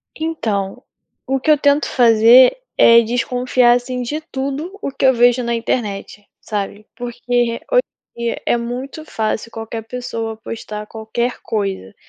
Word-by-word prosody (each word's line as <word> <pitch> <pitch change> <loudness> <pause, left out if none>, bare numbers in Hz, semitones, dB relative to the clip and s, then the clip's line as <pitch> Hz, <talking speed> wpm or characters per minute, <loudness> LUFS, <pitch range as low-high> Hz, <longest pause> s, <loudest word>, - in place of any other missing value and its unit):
Então, 220 -12 -3 0.4
o 270 0 0
que 310 - -2
eu 300 - +6
tento 285 +1 +2
fazer 240 - +6 0.2
é 230 0 +7
desconfiar, 245 +1 +2
assim, 250 +1 -2
de 295 +6 -3
tudo 295 +5 -5
o 275 - -3
que 270 - -1
eu 260 - +6
vejo 245 +1 +4
na 235 0 -1
internet, 210 -3 -3
sabe? 210 0 -5
Porque 240 -1 -8 0.3
re - - -9
hoje - - +5 0.3
em 235 - -9
dia 230 - -2
é - - +2
muito 250 +6 -5
fácil 220 -3 -2
qualquer 225 0 -6
pessoa 225 -2 -5
postar 215 -1 -7
qualquer 225 +3 -3
coisa. 195 - -3
240 Hz, 155 wpm, -18 LUFS, 225-260 Hz, 0.4 s, é